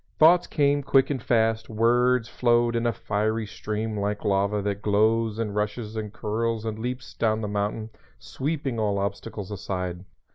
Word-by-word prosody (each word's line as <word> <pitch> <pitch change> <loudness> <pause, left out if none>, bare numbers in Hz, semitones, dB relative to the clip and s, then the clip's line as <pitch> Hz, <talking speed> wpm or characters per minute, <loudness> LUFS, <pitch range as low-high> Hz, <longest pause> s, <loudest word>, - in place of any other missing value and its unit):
Thoughts 170 +3 +6
came 145 -1 +2
quick 135 0 +3
and 130 -4 -2
fast; 115 -2 +1
words 120 +2 +3
flowed 120 -1 +2
in 115 0 +1
a - - +3
fiery 110 +1 -1
stream 110 +1 -4
like 105 0 -2
lava 100 +1 +2
that 100 0 -2
glows 110 +1 +2
and 110 -3 -2
rushes 105 +1 -2
and 105 -2 -4
curls 110 +1 -2
and 110 -1 -3
leaps 125 +2 -5
down 110 -1 0
the 105 - -2
mountain, 105 +2 -2 0.3
sweeping 140 -4 -3
all 105 -2 +1
obstacles 100 0 -4
aside. 90 -3 -4
110 Hz, 160 wpm, -26 LUFS, 105-120 Hz, 0.3 s, Thoughts